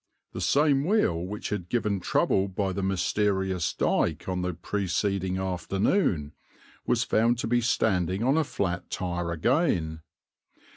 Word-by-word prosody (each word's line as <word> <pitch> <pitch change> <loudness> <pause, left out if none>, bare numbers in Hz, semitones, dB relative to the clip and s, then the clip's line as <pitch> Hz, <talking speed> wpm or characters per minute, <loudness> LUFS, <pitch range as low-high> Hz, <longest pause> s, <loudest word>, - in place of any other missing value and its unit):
The - - -5
same 140 -1 +3
wheel 180 - +2
which 105 +3 -5
had 95 -4 -4
given 105 -5 0
trouble 95 +2 +1
by 95 0 -2
the 100 - -3
mysterious 95 -1 0
dyke - - 0
on 90 -1 -1
the 90 -1 -2
preceding 95 0 -1
afternoon 95 - 0 0.6
was 120 -1 +2
found 115 +1 +2
to - - -3
be 120 +1 +2
standing 95 -4 +1
on 135 +4 +3
a 160 - +3
flat 90 -10 -3
tire 90 -1 -3
again. 85 - +1
95 Hz, 140 wpm, -27 LUFS, 90-115 Hz, 0.6 s, same